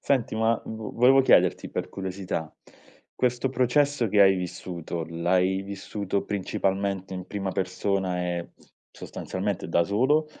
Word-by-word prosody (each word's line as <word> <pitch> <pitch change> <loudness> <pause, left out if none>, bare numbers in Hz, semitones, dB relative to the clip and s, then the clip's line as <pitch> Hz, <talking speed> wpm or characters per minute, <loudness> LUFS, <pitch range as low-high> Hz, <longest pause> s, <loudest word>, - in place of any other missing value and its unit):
Senti, 130 -6 0
ma 110 +1 +2
v 110 -2 -6
volevo 130 +3 +6
chiederti - - +3
per - - -3
curiosità: 95 -4 -4 0.6
questo 125 +1 0
processo 130 0 +2
che 105 +1 +3
hai 95 -1 +7
vissuto, 85 -2 -5
l'hai 90 +3 +1
vissuto 100 0 -3
principalmente 95 -1 -2
in 90 0 -6
prima 100 -2 -3
persona 95 0 -1
e 85 -1 -3 0.4
sostanzialmente 95 -1 -4
da 85 0 +3
solo? 130 - +2
100 Hz, 125 wpm, -26 LUFS, 90-115 Hz, 0.6 s, hai